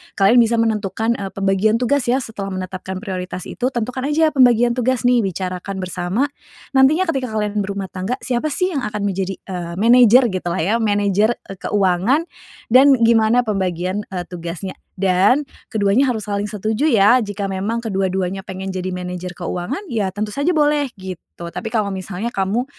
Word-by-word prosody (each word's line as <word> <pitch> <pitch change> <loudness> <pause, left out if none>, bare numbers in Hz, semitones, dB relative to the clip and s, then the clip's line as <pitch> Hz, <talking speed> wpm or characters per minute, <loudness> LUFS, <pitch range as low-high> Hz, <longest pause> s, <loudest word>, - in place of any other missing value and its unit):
kalian 205 +5 +5
bisa 235 0 +4
menentukan, 225 0 0
eee, 195 -1 -4
pembagian 195 +2 +2
tugas 250 +2 +1
ya 245 +2 +3
setelah 200 -3 -6
menetapkan 185 0 -5
prioritas 185 -3 -5
itu, 250 - -2
tentukan 250 +2 -3
aja 315 +1 +3
pembagian 245 -3 +5
tugas 250 -1 0
nih 245 0 +4
bicarakan 185 0 -4
bersama, 185 +5 -1 0.5
nantinya 280 +7 +4
ketika 265 -2 -2
kalian 210 0 -1
berumah 195 -1 -4
tangga, 190 +6 -3
siapa 250 +3 0
sih 365 +5 0
yang 275 - -1
akan 210 0 -4
menjadi, 195 -1 -2
eee, 175 -3 -5
manajer 240 +3 +6
gitulah 175 -1 -2
ya, 215 +7 +1
manajer, 205 +1 +2
eee, 195 - -9
keuangan 205 - +2 0.5
dan 270 +1 +7
gimana 230 +1 +4
pembagian, 185 -1 -1
eee, 180 -2 -4
tugasnya. 175 +2 -6 0.2
Dan 195 +9 +3 0.2
keduanya 220 +5 +2
harus 220 -4 -2
saling 205 0 -2
setuju 220 +8 0
ya, 230 +1 +5
jika 205 -2 -4
memang 205 +5 -3
kedua-duanya 190 -2 -1
pengen 190 -1 -6
jadi 185 0 -3
manajer 180 0 -5
keuangan 180 - -4
ya, 205 -4 0
tentu 210 +2 -4
saja 285 +5 0
boleh, 295 -2 +2
gitu. 185 -2 -9
Tapi 225 - -4
kalau 215 -3 -1
misalnya 195 +5 -5
kamu, 200 +6 0
205 Hz, 165 wpm, -19 LUFS, 190-240 Hz, 0.5 s, dan